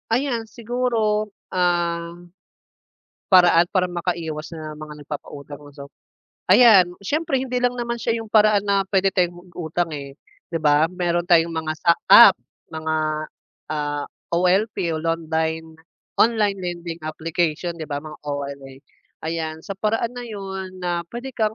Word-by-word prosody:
Ayan, 235 Hz, -1 st, 0 dB
siguro 225 Hz, -3 st, -1 dB, 0.2 s
ah 170 Hz, -2 st, 0 dB, 1.1 s
paraan 175 Hz, -2 st, +6 dB
para 180 Hz, -1 st, +2 dB
makaiwas 170 Hz, -3 st, -3 dB
sa 155 Hz, -1 st, -7 dB
mga 150 Hz, -1 st, -9 dB
nagpapautang, 145 Hz, -1 st, -8 dB
'no 145 Hz, -1 st, -14 dB
so. 140 Hz, -1 st, -10 dB, 0.6 s
Ayan, 195 Hz, -4 st, +7 dB
siyempre 295 Hz, -, 0 dB
hindi 255 Hz, -1 st, -2 dB
lang 245 Hz, 0 st, +1 dB
naman 235 Hz, -1 st, -3 dB
siya 230 Hz, 0 st, 0 dB
'yung 225 Hz, -1 st, -9 dB
paraan 210 Hz, -2 st, +5 dB
na 200 Hz, -1 st, +2 dB
puwede 195 Hz, 0 st, +2 dB
tayong 175 Hz, -1 st, -1 dB
mag-utang, 175 Hz, 0 st, -3 dB
eh, 140 Hz, -2 st, -7 dB, 0.4 s
'di 165 Hz, -, -1 dB
ba? 150 Hz, +1 st, +4 dB
Meron 175 Hz, -1 st, -1 dB
tayong 170 Hz, -2 st, +4 dB
mga 160 Hz, -1 st, -2 dB
sa 170 Hz, -, +4 dB, 0.2 s
app, -, -, +10 dB, 0.3 s
mga, 160 Hz, 0 st, -3 dB, 0.8 s
ah, 145 Hz, -1 st, -2 dB, 0.3 s
OLP 185 Hz, +5 st, +2 dB, 0.2 s
o -, -, -2 dB
londine 160 Hz, -1 st, -2 dB, 0.4 s
online 215 Hz, -3 st, +3 dB
lending 170 Hz, -2 st, -5 dB
application, 165 Hz, +2 st, -2 dB
'di 160 Hz, -, -5 dB
ba, 145 Hz, -, -1 dB
mga 155 Hz, -1 st, -10 dB
OLA. 140 Hz, -2 st, -5 dB, 0.5 s
Ayan, 160 Hz, -1 st, -3 dB
sa 200 Hz, -, -5 dB
paraan 225 Hz, +3 st, 0 dB
na 245 Hz, -, -6 dB
'yun, 190 Hz, -3 st, -7 dB
na 175 Hz, -1 st, -1 dB
puwede 240 Hz, +3 st, -6 dB
kang 215 Hz, -1 st, 0 dB
175 Hz, 140 wpm, -22 LUFS, 160-210 Hz, 1.1 s, app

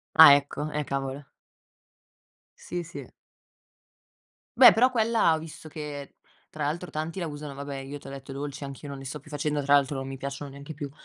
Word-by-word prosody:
Ah, 140 Hz, -, +11 dB
ecco. 145 Hz, +1 st, -3 dB
Eh, 150 Hz, 0 st, -1 dB
cavolo. 135 Hz, +1 st, -3 dB, 1.3 s
Sì, 175 Hz, 0 st, -4 dB
sì. 170 Hz, -, -9 dB, 1.5 s
Beh, 250 Hz, 0 st, +10 dB
però 250 Hz, +3 st, +4 dB
quella 225 Hz, -7 st, +3 dB
ho -, -, -1 dB
visto 155 Hz, 0 st, -10 dB
che, 145 Hz, -2 st, -7 dB, 0.4 s
tra 155 Hz, -1 st, -4 dB
l'altro, 170 Hz, +5 st, -3 dB
tanti 155 Hz, +4 st, -4 dB
la 170 Hz, -, -2 dB
usano 145 Hz, -1 st, -7 dB
vabbè, 140 Hz, 0 st, -6 dB
io, 135 Hz, +2 st, -7 dB
te 140 Hz, -, -12 dB
ho -, -, -7 dB
detto, 135 Hz, 0 st, -8 dB
i -, -, -7 dB
dolci 140 Hz, 0 st, -5 dB
anch'io 140 Hz, +1 st, -8 dB
non 140 Hz, -1 st, -6 dB
li 135 Hz, -, -9 dB
sto 145 Hz, +3 st, -6 dB
più 150 Hz, -, -17 dB
facendo, 150 Hz, 0 st, -1 dB
tra 140 Hz, +1 st, +4 dB
l'altro 140 Hz, 0 st, +3 dB
non 135 Hz, 0 st, -4 dB
mi 135 Hz, -, -6 dB
piacciono 140 Hz, +1 st, -6 dB
neanche 140 Hz, +3 st, -9 dB
più. 145 Hz, -1 st, -6 dB
145 Hz, 200 wpm, -27 LUFS, 140-155 Hz, 1.5 s, Ah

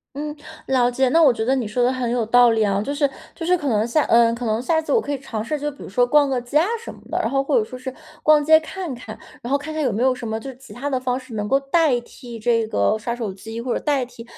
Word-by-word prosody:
嗯， 295 Hz, +1 st, -4 dB, 0.3 s
了 250 Hz, -2 st, +2 dB
解。 260 Hz, +1 st, +1 dB
那 330 Hz, +4 st, +4 dB
我 275 Hz, -5 st, +6 dB
觉 220 Hz, -1 st, -3 dB
得 260 Hz, +4 st, +2 dB
你 250 Hz, -5 st, -2 dB
说 245 Hz, +4 st, 0 dB
的 245 Hz, -, +3 dB
很 255 Hz, -2 st, -2 dB
有 245 Hz, -1 st, +1 dB
道 245 Hz, +2 st, +5 dB
理 225 Hz, -1 st, +1 dB
啊， 200 Hz, -2 st, +1 dB
就 280 Hz, -, -3 dB
是 285 Hz, -1 st, +1 dB, 0.2 s
就 335 Hz, -, -8 dB
是 360 Hz, +2 st, +3 dB
可 295 Hz, -, -4 dB
能 215 Hz, -4 st, +2 dB
下 295 Hz, +5 st, +2 dB
呃， 230 Hz, 0 st, +4 dB
可 240 Hz, +1 st, -5 dB
能 220 Hz, +1 st, 0 dB
下 320 Hz, +5 st, +1 dB
次 320 Hz, -, -2 dB
我 465 Hz, -, +4 dB
可 290 Hz, -, -5 dB
以 285 Hz, -, -1 dB
尝 225 Hz, -5 st, -5 dB
试， 295 Hz, +6 st, -3 dB
就 295 Hz, +1 st, -2 dB
比 285 Hz, -, -16 dB
如 -, -, -8 dB
说 245 Hz, +6 st, +2 dB
逛 290 Hz, +2 st, +4 dB
个 260 Hz, -2 st, 0 dB
街 245 Hz, +3 st, -10 dB
啊 335 Hz, -, +2 dB
什 465 Hz, -, -9 dB
么 -, -, -17 dB
的。 -, -, -2 dB
然 -, -, 0 dB
后 270 Hz, +3 st, 0 dB
或 275 Hz, -, +1 dB
者 455 Hz, -, +3 dB
说 255 Hz, -8 st, -9 dB
是 260 Hz, +1 st, -5 dB, 0.3 s
逛 305 Hz, -1 st, +5 dB
街 315 Hz, +1 st, +6 dB
看 340 Hz, -1 st, -6 dB
看， 230 Hz, -3 st, -9 dB, 0.2 s
然 240 Hz, -, -6 dB
后 280 Hz, -, +4 dB
看 300 Hz, +2 st, -7 dB
看 310 Hz, -, -2 dB
有 260 Hz, -5 st, +1 dB
没 220 Hz, +4 st, -1 dB
有 260 Hz, 0 st, +4 dB
什 245 Hz, -2 st, -7 dB
么 220 Hz, 0 st, -2 dB
就 270 Hz, +4 st, -7 dB
是 -, -, -15 dB
其 265 Hz, -, -15 dB
他 270 Hz, +4 st, -5 dB
的 260 Hz, -3 st, 0 dB
方 255 Hz, 0 st, -1 dB
式 260 Hz, -2 st, -13 dB
能 210 Hz, -1 st, -3 dB
够 270 Hz, +5 st, +3 dB
代 275 Hz, -2 st, +2 dB
替 235 Hz, -1 st, -11 dB
这 230 Hz, 0 st, +1 dB
个 100 Hz, -, +1 dB
刷 235 Hz, +2 st, -3 dB
手 225 Hz, -5 st, -4 dB
机 220 Hz, +4 st, -8 dB
或 240 Hz, +1 st, -2 dB
者 -, -, -1 dB
代 280 Hz, -4 st, 0 dB
替 240 Hz, -1 st, -12 dB
255 Hz, 340 characters per minute, -21 LUFS, 230-285 Hz, 0.3 s, 我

